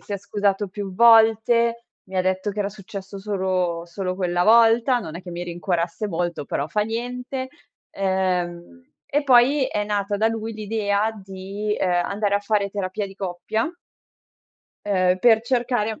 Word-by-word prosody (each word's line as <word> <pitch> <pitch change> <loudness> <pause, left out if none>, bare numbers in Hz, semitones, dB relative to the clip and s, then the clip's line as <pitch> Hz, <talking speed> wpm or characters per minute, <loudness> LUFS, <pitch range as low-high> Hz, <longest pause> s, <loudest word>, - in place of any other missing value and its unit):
si 205 - -9
è - - 0
scusato 200 0 -1
più 195 -1 -6
volte, 230 +1 +5 0.2
mi 190 0 -4
detto 185 +2 0
che 205 +1 -4
era 200 - 0
successo 195 0 -9
solo 185 -4 -1
solo 185 +1 -4
quella 175 -1 0
volta, 230 +3 +5
non 160 -8 -7
è - - -7
che 180 - -10
mi 175 +1 -5
rincuorasse 175 +3 -2
molto, 170 -4 -2
però 140 - -2
fa 210 - 0
niente. 250 +4 -4 0.4
Uhm, 185 +2 -2 0.2
e 290 +1 0
poi, 265 +1 +5
è 210 -5 -2
nata 205 0 -1
da 220 +2 +2
lui 225 0 -4
l'idea 215 0 0
di, 195 +2 -4
uhm, - - 0
andare 200 +4 0
a - - -2
fare 205 -1 0
terapia 200 0 -3
di 195 - -12
coppia 195 - -3 1.2
uhm, 185 -2 +2
per 225 +2 +5
cercare 240 -3 -1
200 Hz, 160 wpm, -23 LUFS, 185-225 Hz, 1.2 s, volte